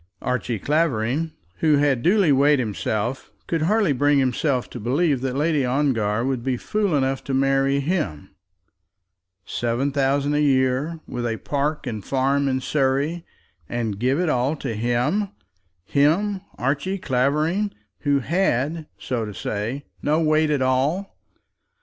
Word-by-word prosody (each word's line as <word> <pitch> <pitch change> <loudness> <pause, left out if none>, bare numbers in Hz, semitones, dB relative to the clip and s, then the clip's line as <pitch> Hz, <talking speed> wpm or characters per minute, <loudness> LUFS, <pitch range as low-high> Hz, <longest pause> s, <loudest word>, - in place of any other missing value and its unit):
Archie 125 -2 -1
Clavering, 150 - 0 0.3
who 155 -2 +3
had 140 -4 +2
duly 185 - +4
weighed 140 +2 +5
himself, 110 +1 -2
could 165 -2 -1
hardly 195 -1 +2
bring 145 +2 +3
himself 130 0 +1
to - - -6
believe 140 +4 +1
that 130 -1 -2
Lady 150 0 +1
Ongar 125 -4 +1
would 130 -3 -1
be 130 -1 0
fool 205 - 0
enough 135 0 0
to 135 - -1
marry 135 +1 +2
him! 140 - -2 1.1
Seven 120 +4 -1
thousand 140 +1 +1
a 150 - +2
year, 135 +3 +1
with 120 -1 -3
a 115 -1 -2
park 145 +4 -2
and 110 -5 -4
farm 140 +3 +1
in 130 -1 0
Surrey, 145 +5 0 0.4
and 115 -4 -2
give 130 +6 +1
it 180 - +1
all 130 +1 +1
to 135 -5 -4
him, 120 - 0 0.6
him, 180 - +2 0.2
Archie 140 +10 -1
Clavering, 155 +8 0 0.3
who 140 -2 +1
had, 155 -1 0
so 120 -3 -3
to 105 -2 -6
say, 115 +10 -3 0.2
no 150 +2 +2
weight 155 -1 +3
at 145 -3 +1
all! 140 +10 0
140 Hz, 145 wpm, -23 LUFS, 125-155 Hz, 1.1 s, weighed